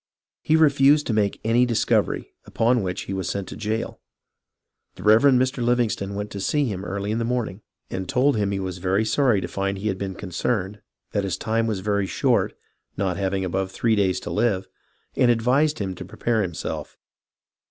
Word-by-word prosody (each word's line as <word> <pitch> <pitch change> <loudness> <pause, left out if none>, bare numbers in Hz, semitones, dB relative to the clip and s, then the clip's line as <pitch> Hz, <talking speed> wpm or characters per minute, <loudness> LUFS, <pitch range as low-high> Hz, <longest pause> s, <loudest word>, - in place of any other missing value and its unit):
He 155 - +2
refused 145 -1 +5
to 115 - -1
make 105 -2 +1
any 115 +2 +3
discovery, 120 -3 +1
upon 120 +1 +2
which 90 -2 -3
he 95 - -5
was 95 -1 -2
sent 100 -1 -3
to - - -7
jail. 110 +1 -3 1.0
The - - -10
Reverend 125 +5 +6
Mr. 130 -1 0
Livingston 115 -5 0
went 105 +1 -4
to 100 - -5
see 145 +9 +1
him 100 -6 -3
early 100 +2 -3
in 110 - 0
the - - 0
morning, 115 -4 -2 0.3
and 95 0 -4
told 135 +2 +3
him 105 -2 0
he 100 -1 -2
was 95 -1 -4
very 95 +4 +1
sorry 110 -2 +2
to - - -3
find 100 0 -2
he 105 +3 -2
had 95 - -3
been 95 -1 -4
concerned, 95 +2 -2 0.3
that 100 - 0
his 95 -3 -2
time 115 +2 0
was 105 -4 -2
very 100 -1 0
short, - - +1 0.4
not 95 -2 -1
having 95 -1 -1
above 95 +1 -1
three 110 +4 +1
days 95 -3 +1
to - - -6
live, 105 -4 0 0.5
and 125 - +4
advised 130 +6 +2
him 95 -2 -3
to 90 - -8
prepare 110 +4 -1
himself. 85 -5 -5
105 Hz, 195 wpm, -24 LUFS, 95-120 Hz, 1.0 s, Reverend